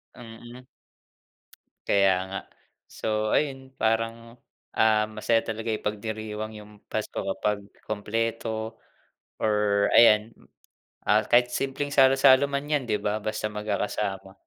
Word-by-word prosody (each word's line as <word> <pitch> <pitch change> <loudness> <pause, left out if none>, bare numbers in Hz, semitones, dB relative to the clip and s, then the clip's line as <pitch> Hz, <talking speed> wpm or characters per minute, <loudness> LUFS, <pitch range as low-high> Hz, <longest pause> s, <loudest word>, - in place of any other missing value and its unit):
Mm. 120 +2 -12 1.2
Kaya 100 -1 +4 0.2
nga. 100 - -4 0.5
So 110 0 -2
ayun 135 -3 -1
parang, 115 +1 -2 0.3
ah, 110 -1 +3
masaya 115 +1 0
talaga 115 0 -4
ipagdiriwang 110 0 -5
yung 105 0 -12 0.2
Pasko 110 - -3
kapag 100 +1 -1 0.3
kumpleto 110 +1 -3 0.6
or 105 -1 +2
ayan, 110 -1 +6 0.8
ah, 105 +1 +4
kahit 120 0 +4
simpleng 135 +2 -2
salo-salo 135 0 +6
man 140 0 -2
yan, 150 -2 0
'di 105 -1 +1
ba, 105 +1 -2
basta 110 0 -2
magkakasama 105 -2 -3
110 Hz, 110 wpm, -26 LUFS, 105-120 Hz, 1.2 s, ayan